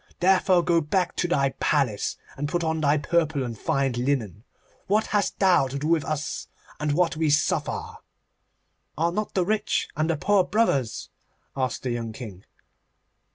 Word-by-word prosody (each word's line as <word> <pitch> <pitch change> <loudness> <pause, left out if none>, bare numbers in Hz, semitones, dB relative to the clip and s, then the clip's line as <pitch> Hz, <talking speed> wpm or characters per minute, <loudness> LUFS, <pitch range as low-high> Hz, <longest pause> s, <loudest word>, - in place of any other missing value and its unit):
Therefore 185 -1 +4
go 170 -1 +3
back 175 +4 0
to 175 - +1
thy 140 -6 +1
Palace 135 -9 0 0.2
and 145 +1 -3
put 175 +1 -1
on 160 -1 -1
thy 145 0 +3
purple 155 -1 0
and 120 -2 -4
fine 135 +1 0
linen. 120 -5 -2 0.4
What 215 +3 +2
hast 205 -1 +1
thou 180 -8 +4
to 135 +2 -5
do 140 - -4
with 165 -3 +3
us, 155 0 -3 0.3
and 150 -1 0
what 165 0 +1
we 160 -1 +1
suffer?' 150 +1 0 1.0
'Are 165 +2 +1
not 210 +4 -3
the 185 -2 +2
rich 215 +2 0
and 155 +2 0
the 165 - +1
poor 195 +4 +3
brothers?' 180 - 0 0.5
asked 130 -2 -2
the 125 - -1
young 115 -2 -3
King. 105 -6 -9
155 Hz, 165 wpm, -25 LUFS, 135-175 Hz, 1.0 s, Therefore